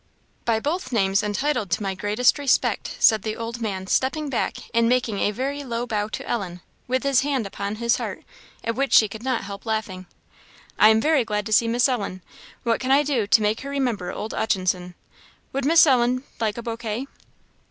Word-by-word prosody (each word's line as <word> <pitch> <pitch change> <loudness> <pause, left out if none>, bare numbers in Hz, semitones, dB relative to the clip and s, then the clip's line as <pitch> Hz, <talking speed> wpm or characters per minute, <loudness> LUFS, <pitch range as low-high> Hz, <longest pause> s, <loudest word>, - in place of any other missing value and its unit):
"By 230 -2 +2
both 295 +2 -3
names 195 -4 +2
h'entitled 210 +1 -1
to 195 - -1
my 195 -1 -1
greatest 210 +8 +2
respect," 280 -3 +1
said 220 -2 +5
the 215 +1 -3
old 230 +1 -5
man, 195 -4 -3
stepping 275 +8 0
back, 250 - -1 0.2
and 230 0 +3
making 240 -5 +1
a - - +2
very 275 +6 -3
low 240 -2 -3
bow 210 -3 -1
to 220 - -6
Ellen, 180 -6 -3 0.3
with 255 +1 0
his 275 -2 +3
hand 270 -5 -1
upon 200 +1 -4
his 235 +1 +1
heart, - - -5 0.4
at 230 - -1
which 275 +3 -1
she 215 - +7
could 215 +2 -9
not 255 -1 -1
help 200 0 -8
laughing. 210 -5 -3 0.7
"I 215 - +8
am 220 0 +4
very 305 -2 +3
glad 210 -2 -2
to 215 - -2
see 230 +2 +4
Miss 240 +1 +2
h'Ellen; 200 -7 -3 0.4
what 230 -1 +1
can 260 - -3
I 275 +2 +5
do 260 -8 0
to 230 0 +5
make 210 +2 0
her 275 - -6
remember 245 -10 -1
old 215 - -5
'Utchinson? 185 -3 -1 0.6
Would 275 0 -1
Miss 325 +3 +7
h'Ellen 255 -2 +2 0.2
like 220 -1 -1
a 235 - -5
bouquet?" 230 +1 -4
230 Hz, 200 wpm, -23 LUFS, 210-260 Hz, 0.7 s, I